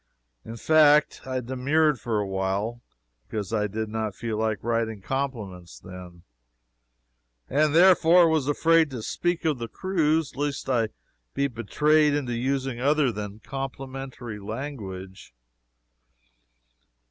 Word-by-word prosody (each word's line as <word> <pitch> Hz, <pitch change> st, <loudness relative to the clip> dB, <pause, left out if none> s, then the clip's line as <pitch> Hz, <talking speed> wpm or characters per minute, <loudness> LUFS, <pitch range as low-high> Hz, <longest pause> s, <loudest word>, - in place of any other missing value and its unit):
In 115 Hz, -, -8 dB
fact, 150 Hz, 0 st, +4 dB
I 130 Hz, -1 st, -2 dB
demurred 135 Hz, +3 st, +1 dB
for 110 Hz, 0 st, -2 dB
a 105 Hz, -, 0 dB
while, 95 Hz, +5 st, -2 dB, 0.5 s
because 105 Hz, -2 st, -4 dB
I 105 Hz, -1 st, +1 dB
did 110 Hz, +2 st, -4 dB
not 110 Hz, -2 st, -3 dB
feel 115 Hz, -2 st, -4 dB
like 110 Hz, -1 st, -1 dB
writing 115 Hz, -2 st, -1 dB
compliments 105 Hz, -, -5 dB
then, 90 Hz, -2 st, -11 dB, 1.2 s
and 150 Hz, +2 st, +2 dB
therefore 175 Hz, -1 st, +6 dB
was 160 Hz, -4 st, +1 dB
afraid 165 Hz, +2 st, +3 dB
to 125 Hz, -5 st, -6 dB
speak 175 Hz, +6 st, -2 dB
of 150 Hz, -5 st, +1 dB
the 115 Hz, -, -4 dB
cruise 160 Hz, -3 st, 0 dB
lest 145 Hz, 0 st, -3 dB
I 130 Hz, -3 st, +2 dB
might 110 Hz, -, -2 dB, 0.4 s
be 140 Hz, -, +1 dB
betrayed 150 Hz, +5 st, +2 dB
into 130 Hz, -5 st, -2 dB
using 130 Hz, +1 st, -2 dB
other 145 Hz, -1 st, +3 dB
than 105 Hz, 0 st, -7 dB
complimentary 135 Hz, -4 st, -6 dB
language. 100 Hz, -, -7 dB
130 Hz, 125 wpm, -25 LUFS, 110-145 Hz, 1.2 s, therefore